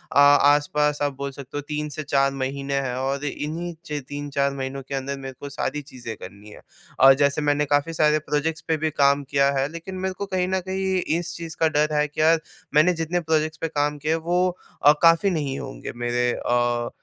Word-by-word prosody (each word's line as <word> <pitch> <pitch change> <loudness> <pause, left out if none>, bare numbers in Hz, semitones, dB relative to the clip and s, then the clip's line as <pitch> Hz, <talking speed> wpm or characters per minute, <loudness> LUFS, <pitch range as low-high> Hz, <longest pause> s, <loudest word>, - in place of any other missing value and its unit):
आ 140 - +7
आस-पास 145 +1 +4
आप 145 -1 0
बोल 140 0 -4
सकते 140 +1 -8
हो, - - -2
3 150 +1 -4
से 155 +1 -5
4 140 -1 +2
महीने 135 +1 -3
हैं 125 -2 -3
और 135 +2 -2
इन्हीं 160 +4 -4
च 150 -3 -4
3-4 145 -1 -1
महीनों 135 0 -4
के 140 - -3
अंदर 135 +1 -3
मेरे 135 -1 -7
को 145 - -7
सारी 145 +1 -3
चीज़ें 125 -5 -8
करनी 100 +3 -11
हैं - - -13 0.4
और 135 0 +10
जैसे 140 +1 +2
मैंने 145 0 +1
काफ़ी 145 +3 +1
सारे 155 -1 +3
प्रोजेक्ट्स 155 +2 -2
पे 160 - +1
भी 155 +1 0
काम 140 0 +3
किया 140 -1 +3
है, 135 - +1
लेकिन 170 +3 -7
मेरे 190 0 -2
को 200 - -3
कहीं 185 -2 -1
न 190 0 0
कहीं 190 0 -1 0.2
इस 170 0 -5
चीज़ 165 -1 -7
का 160 - +4
डर 150 0 +1
है 150 0 +2
कि 150 - -4
यार, 165 +1 +5 0.4
मैंने 160 +4 +5
जितने 165 +1 -1
प्रोजेक्ट्स 155 -1 0
पे 165 - 0
काम 150 -1 -1
किया 150 +2 -1
है, 165 - 0
वो 175 +3 +1 0.4
अ, 145 - +10
काफ़ी 165 +4 +5
नहीं 140 -5 -2
होंगे, 140 -1 -7
मेरे 120 0 0
अ, 120 -1 0
145 Hz, 220 wpm, -24 LUFS, 140-160 Hz, 0.4 s, और